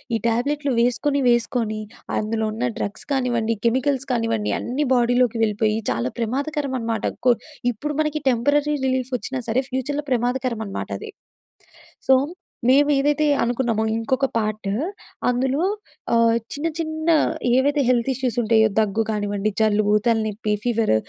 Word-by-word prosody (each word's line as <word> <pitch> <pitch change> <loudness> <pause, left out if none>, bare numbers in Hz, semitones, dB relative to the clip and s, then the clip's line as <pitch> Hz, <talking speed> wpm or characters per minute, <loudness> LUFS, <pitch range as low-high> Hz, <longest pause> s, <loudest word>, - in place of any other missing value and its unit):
ఈ - - 0
ట్యాబ్లెట్‌లు 275 +4 0
వేసుకొని, 275 +4 +1
వేసుకొని 235 -2 0 0.4
అందులో 220 0 -1
ఉన్న 240 +3 -1
డ్రగ్స్ 200 - -4
కానివ్వండి, 235 -4 0
కెమికల్స్ 260 +3 +1
కానివ్వండి 225 -3 0
అన్నీ 270 +5 -1
బాడీలోకి 245 -1 +2
వెళ్ళిపోయి, 215 0 +1
చాలా 120 +2 -1
ప్రమాదకరం 275 +4 -2
అనమాట. 230 -1 -2 0.2
కొ 245 - +7 0.4
ఇప్పుడు 295 +7 -4
మనకి 305 0 -1
టెంపరరీ 285 +5 +2
రిలీఫ్ 260 0 -1
వచ్చినా 260 +1 -4
సరే, 250 +4 +2
ఫ్యూచర్‍లో 285 +3 -2
ప్రమాదకరం 245 -1 0
అనమాట 195 - -5
అది. 440 -1 -8 1.0
సో, 265 - +8 0.5
మేము 285 +3 +5
ఏదైతే 295 +2 +2 0.2
అనుకున్నామో, 235 -2 0
ఇంకొక 260 +4 0
పార్టు. 215 -2 -2 0.6
అందులో 260 +5 +1 0.5
ఆహ్, 230 0 +4 0.2
చిన్న, 295 +3 -2
చిన్న 315 -1 -3 0.5
ఏవైతే 285 +3 +3
హెల్త్ 245 +1 +2
ఇష్యూస్ 255 -2 -2
ఉంటాయో, 220 0 +4
దగ్గు 215 +1 +1
కానివ్వండి 205 0 -1
జలుబు, 210 -1 +3
తలనొప్పి 220 -2 0
ఫీవర్ 230 - +2
240 Hz, 130 wpm, -22 LUFS, 220-270 Hz, 1.0 s, సో